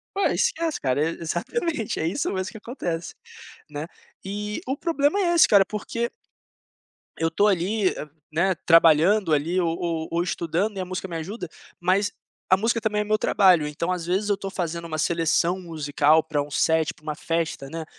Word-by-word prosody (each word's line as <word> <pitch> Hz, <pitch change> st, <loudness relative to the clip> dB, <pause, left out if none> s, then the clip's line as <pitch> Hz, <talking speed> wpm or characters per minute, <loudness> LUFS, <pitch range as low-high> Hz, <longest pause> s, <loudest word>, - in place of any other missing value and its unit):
Pô, 400 Hz, -, +1 dB
esquece, 335 Hz, -11 st, 0 dB
cara! 130 Hz, 0 st, 0 dB
É -, -, 0 dB
exatamente, 225 Hz, -, -2 dB
é 160 Hz, -, 0 dB
isso 200 Hz, +8 st, -1 dB
mesmo 185 Hz, -1 st, -2 dB
que -, -, -10 dB
acontece, 175 Hz, -8 st, -5 dB, 0.6 s
né? 150 Hz, +1 st, -5 dB, 0.4 s
E 210 Hz, +2 st, -4 dB
o 265 Hz, +2 st, -1 dB
problema 315 Hz, +3 st, +1 dB
é 345 Hz, -2 st, +2 dB
esse, 335 Hz, -, +7 dB
cara, 200 Hz, -2 st, +6 dB
porque 230 Hz, +3 st, -3 dB, 1.1 s
eu 165 Hz, 0 st, 0 dB
tô 200 Hz, +6 st, +2 dB
ali, 195 Hz, +1 st, +2 dB
eh, 150 Hz, -, -7 dB, 0.2 s
né, 180 Hz, +4 st, +2 dB
trabalhando 165 Hz, +3 st, +5 dB
ali, 165 Hz, +5 st, +1 dB
ou 165 Hz, -1 st, 0 dB
ou 165 Hz, -2 st, -2 dB
ou 170 Hz, +1 st, +1 dB
estudando 180 Hz, +4 st, -1 dB
e -, -, -3 dB
a 185 Hz, -, -2 dB
música 185 Hz, +1 st, -5 dB
me 170 Hz, -, -5 dB
ajuda. 180 Hz, +3 st, -5 dB, 0.3 s
Mas 190 Hz, +3 st, +1 dB, 0.4 s
a 185 Hz, -, +7 dB
música 230 Hz, +3 st, 0 dB
também 210 Hz, -1 st, 0 dB
é -, -, -4 dB
meu 215 Hz, 0 st, +1 dB
trabalho, 180 Hz, -8 st, +4 dB
então, 170 Hz, +5 st, -2 dB
às 175 Hz, -2 st, -4 dB
vezes, 195 Hz, +4 st, 0 dB
eu 205 Hz, -, +3 dB
tô 195 Hz, 0 st, -6 dB
fazendo 170 Hz, -3 st, -3 dB
uma 155 Hz, -1 st, -4 dB
seleção 170 Hz, +3 st, +1 dB
musical, 155 Hz, -2 st, +2 dB
pra 150 Hz, -2 st, -1 dB
um 145 Hz, -, -10 dB
set, 160 Hz, +2 st, +1 dB
pra -, -, -25 dB
uma 155 Hz, 0 st, -4 dB
festa, 160 Hz, -3 st, -2 dB
né. 165 Hz, -1 st, -5 dB
180 Hz, 190 wpm, -24 LUFS, 165-210 Hz, 1.1 s, esse